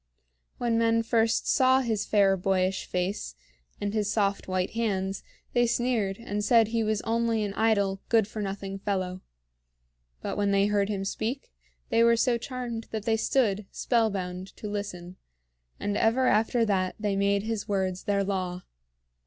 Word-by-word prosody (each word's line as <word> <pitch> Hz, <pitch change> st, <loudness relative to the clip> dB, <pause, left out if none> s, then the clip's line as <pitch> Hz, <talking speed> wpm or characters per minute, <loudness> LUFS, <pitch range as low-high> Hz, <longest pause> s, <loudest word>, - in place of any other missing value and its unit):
When 230 Hz, -1 st, +1 dB
men 230 Hz, 0 st, +3 dB
first 225 Hz, 0 st, +1 dB
saw 260 Hz, -1 st, +4 dB
his 220 Hz, -4 st, -1 dB
fair 200 Hz, -2 st, +4 dB
boyish 190 Hz, 0 st, 0 dB
face 180 Hz, -, -2 dB, 0.4 s
and 205 Hz, 0 st, -2 dB
his 210 Hz, -2 st, 0 dB
soft 200 Hz, -2 st, 0 dB
white 185 Hz, 0 st, -1 dB
hands, 195 Hz, -4 st, -1 dB, 0.3 s
they 240 Hz, -1 st, +3 dB
sneered 230 Hz, -5 st, 0 dB
and 210 Hz, -3 st, -4 dB
said 225 Hz, 0 st, +4 dB
he 230 Hz, 0 st, 0 dB
was 215 Hz, -1 st, -1 dB
only 230 Hz, -1 st, +1 dB
an 200 Hz, -1 st, -3 dB
idle, 200 Hz, -3 st, +1 dB
good 225 Hz, -3 st, +4 dB
for 215 Hz, 0 st, -6 dB
nothing 195 Hz, 0 st, -4 dB
fellow. 185 Hz, -2 st, -2 dB, 1.0 s
But -, -, -3 dB
when 205 Hz, -1 st, +1 dB
they 200 Hz, 0 st, +3 dB
heard 205 Hz, -1 st, +1 dB
him 195 Hz, -2 st, -2 dB
speak, 235 Hz, +7 st, -4 dB, 0.4 s
they 230 Hz, -, +3 dB
were 235 Hz, 0 st, +5 dB
so 240 Hz, 0 st, +2 dB
charmed 240 Hz, -2 st, -5 dB
that 215 Hz, -2 st, -5 dB
they 225 Hz, -, +2 dB
stood, 215 Hz, -4 st, +1 dB
spellbound, 195 Hz, -6 st, -1 dB
to 210 Hz, -, -6 dB
listen; 185 Hz, -3 st, -5 dB, 0.6 s
and 205 Hz, 0 st, -2 dB
ever 230 Hz, +5 st, +2 dB
after 225 Hz, +1 st, +3 dB
that 185 Hz, -3 st, 0 dB
they 205 Hz, -2 st, 0 dB
made 200 Hz, 0 st, +1 dB
his 220 Hz, -2 st, -3 dB
words 190 Hz, -2 st, -1 dB
their 200 Hz, -1 st, +1 dB
law. 185 Hz, -2 st, -3 dB
205 Hz, 160 wpm, -27 LUFS, 195-230 Hz, 1.0 s, were